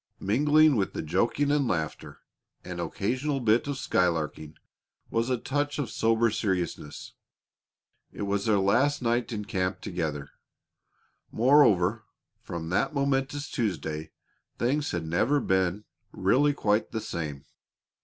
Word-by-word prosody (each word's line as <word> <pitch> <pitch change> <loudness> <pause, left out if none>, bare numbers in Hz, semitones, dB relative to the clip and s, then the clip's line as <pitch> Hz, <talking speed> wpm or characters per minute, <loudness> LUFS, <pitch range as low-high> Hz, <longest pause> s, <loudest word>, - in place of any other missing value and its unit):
Mingling 150 +8 +4
with 95 - -1
the - - -4
joking 115 - +1
and 145 -3 +2
laughter 80 -7 -3 0.4
and 90 -1 -5
occasional 130 - -2
bit 115 +1 +2
of 145 -2 -2
skylarking 80 - -1 0.6
was 115 +2 0
a 125 - +1
touch 145 +4 -2
of 135 -7 -3
sober 115 0 +2
seriousness. 90 -8 -3 1.0
It - - -6
was 100 0 -1
their 110 -2 +3
last 125 +9 +2
night 120 +1 0
in 105 -2 -4
camp 95 -3 -2
together. 75 -6 -4 1.0
Moreover, 110 -6 +4 0.4
from 80 -1 -6
that 100 - 0
momentous 140 +1 0
Tuesday 80 -8 -3 0.5
things 145 +5 0
had 85 -2 -3
never 110 - +2
been 95 -2 0 0.3
really 145 +2 +2
quite 105 -5 0
the 110 - -2
same. 80 -10 -5
110 Hz, 125 wpm, -27 LUFS, 90-135 Hz, 1.0 s, Mingling